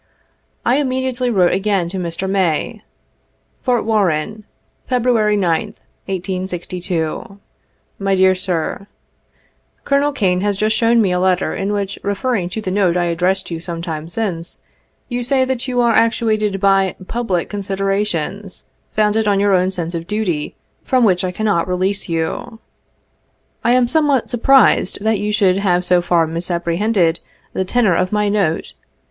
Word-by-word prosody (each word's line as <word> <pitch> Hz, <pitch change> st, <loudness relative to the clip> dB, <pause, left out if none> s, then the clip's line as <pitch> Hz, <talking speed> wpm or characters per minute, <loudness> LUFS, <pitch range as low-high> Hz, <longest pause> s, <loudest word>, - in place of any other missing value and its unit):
I 245 Hz, +3 st, +3 dB
immediately 260 Hz, -2 st, -1 dB
wrote 185 Hz, -6 st, +3 dB
again 195 Hz, -2 st, 0 dB
to 190 Hz, +1 st, -4 dB
Mr. 175 Hz, +2 st, -3 dB
May: 195 Hz, +3 st, 0 dB, 0.4 s
" -, -, -44 dB
Fort 245 Hz, -2 st, 0 dB
Warren, 210 Hz, -1 st, 0 dB, 0.4 s
February 235 Hz, -4 st, +2 dB
2th, 195 Hz, +3 st, 0 dB, 0.3 s
1862. 180 Hz, -1 st, -3 dB, 0.6 s
"My 195 Hz, -1 st, +1 dB
Dear 190 Hz, 0 st, +5 dB
Sir:— 185 Hz, +1 st, -3 dB, 0.5 s
" -, -, -41 dB
Colonel 280 Hz, +1 st, +2 dB
Kane 185 Hz, -9 st, 0 dB
has 205 Hz, -1 st, 0 dB
just 215 Hz, +2 st, +1 dB
shown 230 Hz, 0 st, +3 dB
me 190 Hz, -, +1 dB
a 180 Hz, -, +1 dB
letter, 185 Hz, 0 st, +1 dB
in 195 Hz, +1 st, -2 dB
which, 200 Hz, -1 st, -3 dB
refer 200 Hz, +6 st, -2 dB
ring 185 Hz, -7 st, -1 dB
to 220 Hz, +4 st, -4 dB
the 185 Hz, -, -3 dB
note 185 Hz, -3 st, +2 dB
I 175 Hz, -, +1 dB
addressed 185 Hz, +2 st, 0 dB
you 165 Hz, -, -3 dB
some 170 Hz, -1 st, -6 dB
time 160 Hz, -1 st, -5 dB
since, 175 Hz, -4 st, -3 dB, 0.5 s
you 245 Hz, -1 st, -3 dB
say 260 Hz, +2 st, +2 dB
that 260 Hz, -1 st, -2 dB
you 250 Hz, -1 st, +1 dB
are 235 Hz, -1 st, +3 dB
actuated 215 Hz, -3 st, +1 dB
by 195 Hz, -1 st, +2 dB
' 185 Hz, -, -12 dB
public 210 Hz, -8 st, -1 dB
considerations,' 195 Hz, -1 st, -3 dB, 0.3 s
founded 215 Hz, 0 st, +2 dB
on 200 Hz, -1 st, +3 dB
your 200 Hz, 0 st, +3 dB
own 185 Hz, 0 st, +3 dB
sense 175 Hz, -2 st, -3 dB
of 165 Hz, 0 st, -5 dB
duty, 190 Hz, -8 st, -2 dB, 0.3 s
from 255 Hz, -2 st, +1 dB
which 185 Hz, -5 st, +3 dB
I 185 Hz, -, -1 dB
cannot 200 Hz, -3 st, 0 dB
release 185 Hz, +2 st, -1 dB
you. 165 Hz, +7 st, -3 dB, 1.0 s
I 235 Hz, -, +3 dB
am 250 Hz, -1 st, +3 dB
somewhat 290 Hz, -3 st, +1 dB
surprised 245 Hz, -5 st, +3 dB
that 220 Hz, -2 st, +1 dB
you 210 Hz, +1 st, -1 dB
should 195 Hz, -3 st, +3 dB
have 180 Hz, -3 st, +1 dB
so 180 Hz, -1 st, +3 dB
far 175 Hz, -1 st, +2 dB
misapprehended 170 Hz, +2 st, 0 dB, 0.3 s
the 190 Hz, -, 0 dB
tenor 220 Hz, -1 st, +2 dB
of 185 Hz, +2 st, 0 dB
my 210 Hz, -1 st, +1 dB
note. 195 Hz, -6 st, 0 dB
195 Hz, 160 wpm, -18 LUFS, 180-220 Hz, 1.0 s, Dear